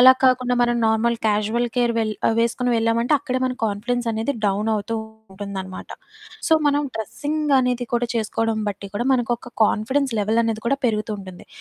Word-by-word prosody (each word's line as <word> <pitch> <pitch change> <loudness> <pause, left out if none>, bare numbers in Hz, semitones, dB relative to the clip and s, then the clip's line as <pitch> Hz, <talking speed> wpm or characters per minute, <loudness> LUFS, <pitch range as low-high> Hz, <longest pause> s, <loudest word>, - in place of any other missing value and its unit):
అలాగ 260 +1 +9
కాకుండా 250 -1 +2
మనం 240 0 +2
నార్మల్, 225 +2 +2
కాజుయల్ 215 +3 +1
కేర్ 240 -1 +2
వెళ్ 215 -1 0 0.2
ఆహ్, 225 - +1
వేసుకొని 240 +1 +1
వెళ్ళావంటే, 230 +4 +2
అక్కడే 260 -2 -2
మన 255 - -2
కాన్ఫిడెన్సనేది 230 +3 -1
డౌనవుతూ 210 +2 0 0.4
ఉంటుందనమాట. 190 -2 -6 0.6
సో, - - +3 0.2
మనం 290 +1 +1
డ్రస్సింగ్ 295 +6 -1
అనేది 250 -1 -1
కూడా 240 0 0
చేసుకోడం 225 0 -1
బట్టి 200 0 -6
కూడా, 240 - -1
మనకొక 245 0 -2
కాన్ఫిడెన్స్ 260 +5 0
లెవెలనేది 220 +1 +1
కూడా 275 +1 +1
పెరుగుతూ 215 -2 0
ఉంటుంది. 185 -2 -11
230 Hz, 150 wpm, -22 LUFS, 215-250 Hz, 0.6 s, అలాగ